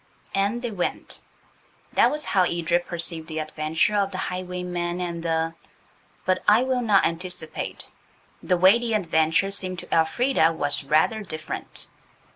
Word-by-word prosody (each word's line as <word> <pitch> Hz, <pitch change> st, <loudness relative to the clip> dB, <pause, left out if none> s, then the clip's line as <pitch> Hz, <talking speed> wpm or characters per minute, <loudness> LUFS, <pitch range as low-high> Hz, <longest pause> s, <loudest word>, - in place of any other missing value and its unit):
And 205 Hz, +5 st, 0 dB
they 240 Hz, -, -2 dB
went. 185 Hz, -4 st, -4 dB, 0.7 s
That -, -, +5 dB
was 300 Hz, 0 st, -3 dB
how 190 Hz, -, +2 dB
Edred 175 Hz, 0 st, +1 dB
perceived 165 Hz, -2 st, -3 dB
the 160 Hz, -, -6 dB
adventure 155 Hz, +7 st, 0 dB
of 200 Hz, -1 st, +2 dB
"The 190 Hz, -, -6 dB
Highwayman 180 Hz, -1 st, -3 dB
and 170 Hz, -2 st, -3 dB
the 165 Hz, 0 st, 0 dB, 0.3 s
—." -, -, -35 dB
But 185 Hz, 0 st, +1 dB
I 215 Hz, +4 st, +6 dB
will 260 Hz, -1 st, 0 dB
not 210 Hz, -4 st, +4 dB
anticipate. 170 Hz, -1 st, -4 dB, 0.6 s
The 180 Hz, -, +1 dB
way 190 Hz, +6 st, +6 dB
the 235 Hz, -2 st, 0 dB
adventure 165 Hz, 0 st, +2 dB
seemed 185 Hz, -2 st, 0 dB
to -, -, -6 dB
Elfrida 165 Hz, +2 st, +3 dB
was 145 Hz, -2 st, -1 dB
rather 155 Hz, +10 st, +2 dB
different. 155 Hz, -6 st, -4 dB
180 Hz, 150 wpm, -24 LUFS, 165-200 Hz, 0.7 s, I